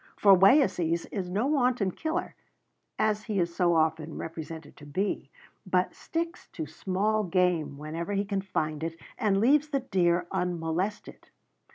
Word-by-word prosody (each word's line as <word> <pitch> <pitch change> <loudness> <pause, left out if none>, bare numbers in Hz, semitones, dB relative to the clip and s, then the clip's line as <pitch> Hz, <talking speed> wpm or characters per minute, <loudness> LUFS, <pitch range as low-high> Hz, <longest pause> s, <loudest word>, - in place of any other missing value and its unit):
For 200 -2 +7
Wayeeses 185 - +4
is 185 -4 -3
no 205 +7 0
wanton 250 -8 +2
killer, 320 - -3 0.6
as 215 -1 +1
he 210 -4 -1
is 170 -1 -1
so 175 -2 +3
often 160 0 0
represented 160 -1 -7
to 145 - -12
be, 185 -2 -2 0.3
but 185 -2 +1
sticks 335 +1 -4
to 160 - -4
small 195 +7 0
game 180 -6 +1
whenever 165 +6 -4
he 200 +1 0
can 200 -1 -1
find 155 -5 -2
it, 165 0 -4 0.2
and 205 -5 +2
leaves 285 +7 +4
the 275 -2 0
deer 180 -7 +1
unmolested. 180 +2 -3
185 Hz, 150 wpm, -28 LUFS, 165-210 Hz, 0.6 s, For